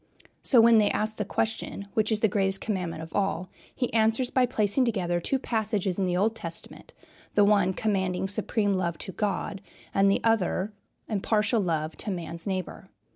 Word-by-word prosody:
So, 250 - +4
when 230 -1 +6
they 210 - +3
ask 215 +1 -1
the 210 - -2
question, 220 -1 -3
"Which 215 0 +1
is 215 -1 +1
the 220 - +5
greatest 195 -1 0
commandment 175 -6 -3
of 160 - -11
all?" 195 -3 -1 0.3
he 245 - -2
answers 225 +3 +2
by 255 -1 +3
placing 220 +1 +2
together 185 -7 0
two 270 +10 0
passages 210 -6 -1
in 190 - +2
the 180 -1 0
Old 215 +4 +1
Testament, 165 -5 -7 0.4
the 205 - +6
one 200 -3 +4
commanding 190 -3 -1
supreme 205 +1 +1
love 170 -3 -1
to - - -7
God 195 -1 -2 0.3
and 195 0 +4
the 195 - +2
other 210 -2 +1 0.3
impartial 215 +2 +1
love 160 -3 -1
to - - -4
man's 170 -1 -5
neighbor. 185 -2 -4
200 Hz, 180 wpm, -27 LUFS, 185-220 Hz, 0.4 s, when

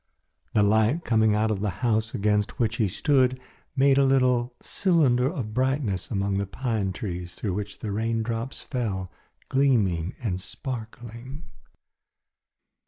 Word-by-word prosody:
The 105 - +5
light 110 +10 +2
coming 110 -2 +3
out 110 +1 +1
of 105 - -1
the 105 +1 0 0.2
house 110 -1 +1
against 105 0 0
which 115 -1 0
he 110 - +2
stood 130 - +2 0.4
made 135 0 +4
a - - +5
little 125 -2 +2
cylinder 145 -9 +2
of 120 -11 -5
brightness 130 -6 0
among 100 -1 0
the 100 - -2
pine 105 -1 -2
trees 90 -2 -5
through 100 -4 -3
which 100 +1 -4
the 105 - -5
raindrops 115 +3 -2
fell 100 -8 -3 0.4
gleaming 105 -11 +2
and 95 -7 -2
sparkling. 120 - -7
115 Hz, 135 wpm, -26 LUFS, 100-130 Hz, 0.4 s, The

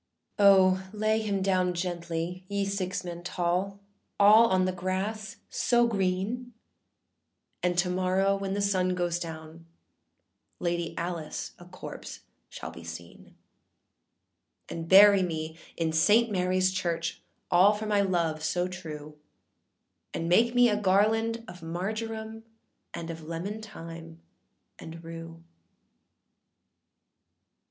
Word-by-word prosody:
â 200 - +5
âO, 190 0 +2
lay 215 +1 +1
him 200 -3 -1
down 185 -2 +1
gently, 175 0 -3
ye 200 0 -1
six 195 -1 -2
men 175 -1 -6
tall, 180 +3 -1 0.4
All 215 +3 +8
on 185 -3 +2
the 185 - +1
grass 190 +4 -3
so 240 -1 +2
green, 210 +4 -1 1.1
And 180 -1 0
to 175 +1 +3
morrow 185 +2 +2
when 195 0 -3
the 200 - 0
sun 185 -2 +1
goes 175 -1 -1
down, 160 0 -8 0.9
Lady 170 -1 -2
Alice 170 -2 -4
a 175 - -12
corpse 180 +1 -9 0.3
shall - - -7
be - - -11
seen. 85 +1 -10 1.3
âAnd 165 -1 -5
bury 200 +2 +8
me 160 -3 -3 0.2
in 160 -1 0
Saint 215 +8 +4
Maryâs 185 0 +1
Church, 170 -3 -2 0.3
All 185 +4 +6
for 210 +1 -5
my 205 -1 +2
love 170 -5 0
so 175 +3 0
true; 155 -4 -8 1.0
And 165 - -2
make 235 +8 +4
me 245 0 +6
a 210 -2 0
garland 220 +4 +2
of 180 -4 -11
marjoram, 220 +6 -4 0.5
And 165 0 -5
of 165 0 -8
lemon 185 +6 -4
thyme, 165 -5 -10 0.6
and 165 +1 -9
rue. 165 0 -9
185 Hz, 125 wpm, -28 LUFS, 170-200 Hz, 1.3 s, All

